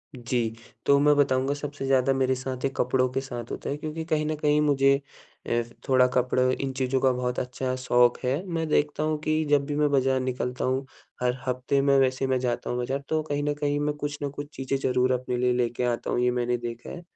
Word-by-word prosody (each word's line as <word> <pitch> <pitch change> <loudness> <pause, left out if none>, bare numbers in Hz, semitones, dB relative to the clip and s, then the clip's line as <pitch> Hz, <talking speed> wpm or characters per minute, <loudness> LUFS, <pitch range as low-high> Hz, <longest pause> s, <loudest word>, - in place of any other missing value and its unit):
जी, 120 -2 -2 0.3
तो 140 - +5
मैं 150 0 +5
बताऊँगा 135 -1 +2
सबसे 145 -1 -5
ज़्यादा 135 0 +3
मेरे 130 -1 +1
साथ, 130 0 -5
ये - - +2
कपड़ों 130 +1 +2
के 130 +1 -2
साथ 120 -3 -7
होता - - -5
है 140 - -2
क्योंकि 155 +2 -5
कहीं 155 -2 0
न 155 0 -1
कहीं 150 0 +2
मुझे 140 -2 +4 0.5
अ, 120 0 +2 0.3
थोड़ा 130 -1 +5
कपड़ा 125 0 +2 0.2
इन 135 - -2
चीज़ों 130 0 +1
का 130 -1 +4
बहुत 125 0 -2
अच्छा 130 +1 -3
शौक़ 120 -1 +4
है। 130 +2 +2
मैं 165 -3 -2
देखता 150 0 +1
हूँ 155 0 0
कि 155 0 +1
जब 145 -1 +3
भी 145 0 -3
मैं 150 0 +2
बाज़ार 135 -1 +2
निकलता 125 -1 -2
हूँ। 130 +1 0 0.4
हर 125 0 +1
हफ्ते 130 +2 0
में 140 0 +4
वैसे 130 0 +1
मैं 130 -1 +1
जाता 125 -1 -2
हूँ 120 - -1
बाज़ार, 130 +3 -1
तो 155 0 +1
कहीं 145 -1 -2
न 150 - 0
कहीं 145 0 +1
मैं 150 0 0
कुछ 145 0 -4
ना 145 - -1
कुछ 145 +1 -7
चीज़ें 135 +1 -1
ज़रूर 130 -1 +1
अपने 125 0 -2
लिए 125 0 +2
लेके 120 0 -1
आता 120 -1 -1
हूँ, - - +1
ये 125 0 +3
मैंने 120 0 0
देखा 120 0 -7
है। 175 - -7
130 Hz, 230 wpm, -26 LUFS, 125-145 Hz, 0.5 s, तो